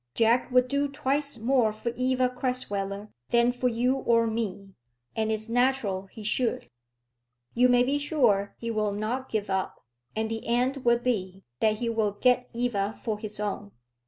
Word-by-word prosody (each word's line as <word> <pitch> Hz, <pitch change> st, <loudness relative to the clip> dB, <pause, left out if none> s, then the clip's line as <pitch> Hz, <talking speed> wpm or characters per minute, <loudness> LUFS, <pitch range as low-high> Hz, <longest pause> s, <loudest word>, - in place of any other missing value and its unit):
Jack 230 Hz, +2 st, +3 dB
would 250 Hz, 0 st, +4 dB
do 280 Hz, +2 st, +1 dB
twice 280 Hz, 0 st, -1 dB
more 235 Hz, -1 st, +2 dB
for 215 Hz, +2 st, -4 dB
Eva 255 Hz, 0 st, +2 dB
Crasweller 210 Hz, -6 st, -2 dB, 0.2 s
than 235 Hz, +1 st, +4 dB
for 250 Hz, +1 st, -1 dB
you 250 Hz, +3 st, +1 dB
or 230 Hz, -3 st, +3 dB
me, 215 Hz, -3 st, -3 dB, 0.4 s
and 220 Hz, 0 st, 0 dB
it's 220 Hz, 0 st, -1 dB
natural 230 Hz, -6 st, +1 dB
he 215 Hz, +2 st, -11 dB
should. 225 Hz, -, -1 dB, 0.9 s
You 250 Hz, +1 st, +4 dB
may 245 Hz, 0 st, +5 dB
be 275 Hz, +3 st, 0 dB
sure 240 Hz, -10 st, +1 dB
he 230 Hz, 0 st, -4 dB
will 215 Hz, -2 st, 0 dB
not 230 Hz, +6 st, -3 dB
give 215 Hz, -2 st, -2 dB
up; 190 Hz, -8 st, -3 dB, 0.3 s
and 220 Hz, 0 st, 0 dB
the 225 Hz, 0 st, -5 dB
end 250 Hz, +4 st, +1 dB
will 240 Hz, -3 st, +3 dB
be, 195 Hz, -6 st, -2 dB, 0.2 s
that 215 Hz, -1 st, +3 dB
he 235 Hz, +2 st, -3 dB
will 220 Hz, -3 st, 0 dB
get 250 Hz, +3 st, +2 dB
Eva 225 Hz, -4 st, -1 dB
for 220 Hz, -3 st, -2 dB
his 210 Hz, -1 st, -6 dB
own. 205 Hz, -1 st, -4 dB
230 Hz, 170 wpm, -27 LUFS, 210-250 Hz, 0.9 s, may